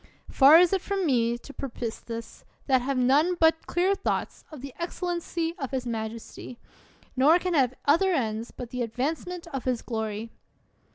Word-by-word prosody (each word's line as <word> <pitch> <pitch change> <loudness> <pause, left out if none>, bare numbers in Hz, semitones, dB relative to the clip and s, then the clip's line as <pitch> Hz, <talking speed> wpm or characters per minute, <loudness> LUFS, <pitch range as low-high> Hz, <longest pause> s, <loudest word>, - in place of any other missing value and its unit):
Far 285 +4 +8
is 355 +1 +5
it 385 - +1
Irom 395 -1 -2
me 240 -5 +2
to 285 +4 -13
purpose 240 -5 -5
this, 230 -1 -8 0.2
that 260 -3 +3
have 270 +1 -2
none 285 +8 +3
but 320 -1 +2
clear 365 +3 +2
thoughts 395 - -3
of 300 -5 -9
the 275 -1 -8
excellency 340 -1 -3
of 270 -4 -3
his 260 -2 -3
majesty, 230 +1 -6 0.6
nor 285 +6 +5
can 360 0 -2
have 260 -5 +2
other 335 +7 +4
ends 225 -7 -1
but 245 -2 -9
the 250 - -3
advancement 300 +9 -3
of 270 - -4
his 250 -3 -1
glory. 220 -1 -4
270 Hz, 170 wpm, -26 LUFS, 240-335 Hz, 0.6 s, Far